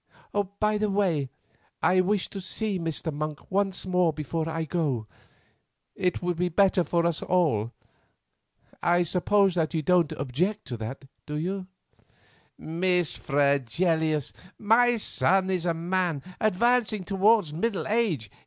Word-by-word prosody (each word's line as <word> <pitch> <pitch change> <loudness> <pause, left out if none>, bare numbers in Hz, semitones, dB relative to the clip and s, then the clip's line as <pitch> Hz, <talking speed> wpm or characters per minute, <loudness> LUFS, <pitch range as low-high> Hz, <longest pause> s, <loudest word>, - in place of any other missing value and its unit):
By 210 0 +1
the 215 0 +1
way, 180 -9 +1 0.5
I 185 +3 +4
wish 195 +1 0
to 195 - -6
see 200 +1 -2
Mr. 165 -1 -3
Monk 150 0 -5
once 195 -1 0
more 180 -2 +2
before 160 +2 -3
I 160 0 -2
go; 145 -9 -1 0.9
it 180 -1 -1
would 175 -1 -1
be 180 +1 0
better 185 +1 +3
for 170 0 0
us 170 -2 0
all. 145 - +1 1.1
I 175 +1 +3
suppose 190 +3 +2
that 165 -1 -1
you 155 - 0
don't 175 -1 +3
object 175 - -2
to 120 - -4
that, 125 +5 -7 0.2
do 150 - -4
you?" 185 +4 -3 0.9
"Miss 175 +1 0
Fregelius, 145 +2 +1 0.2
my 235 +3 +4
son 190 -3 +1
is 180 -2 -1
a 170 - +1
man 170 -3 -1 0.2
advancing 215 0 +2
towards 195 -2 +3
middle 205 +4 -1
age. 185 - 0
175 Hz, 135 wpm, -26 LUFS, 155-195 Hz, 1.1 s, I